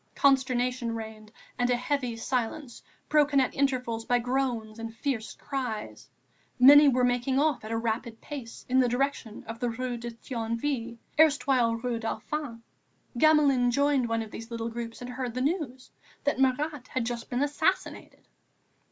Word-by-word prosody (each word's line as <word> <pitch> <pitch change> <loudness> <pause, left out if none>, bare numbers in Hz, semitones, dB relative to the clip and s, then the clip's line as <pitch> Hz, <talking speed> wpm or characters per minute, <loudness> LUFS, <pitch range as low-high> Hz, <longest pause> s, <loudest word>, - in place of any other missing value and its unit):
Consternation 255 -3 +2
reigned 220 -1 -8 0.3
and 245 0 +2
a 245 - +3
heavy 250 -1 -2
silence, 245 +2 -3 0.3
broken 295 -2 +4
at 260 - +1
intervals 250 -5 0
by 245 +2 +2
groans 240 -3 -2
and 225 0 -6
fierce 240 -4 -3
cries. 250 -6 -5 0.5
Many 285 +3 +9
were 255 -2 +3
making 245 +2 +1
off 295 -3 +1
at 215 - -7
a 225 - 0
rapid 225 0 -3
pace 265 -6 -8
in 255 +1 +3
the 255 - +4
direction 250 -3 -2
of 225 -1 -8
the 245 -1 0
Rue 245 +1 -3
de 235 0 -6
Thionville, 230 +1 -3 0.2
erstwhile 270 -6 +4
Rue 235 0 -2
Dauphine; 230 +1 -4 0.6
Gamelin 285 -5 +5
joined 280 -1 +2
one 230 0 0
of 215 - -11
these 225 - -8
groups 230 0 -5
and 245 - -6
heard 250 -2 -4
the 255 - -1
news 275 -4 -2 0.3
that 285 - 0
Marat 270 +1 0
had 255 -3 -2
just 235 -1 -4
been 250 +3 0
assassinated. 290 0 -2
245 Hz, 155 wpm, -28 LUFS, 230-275 Hz, 0.6 s, Many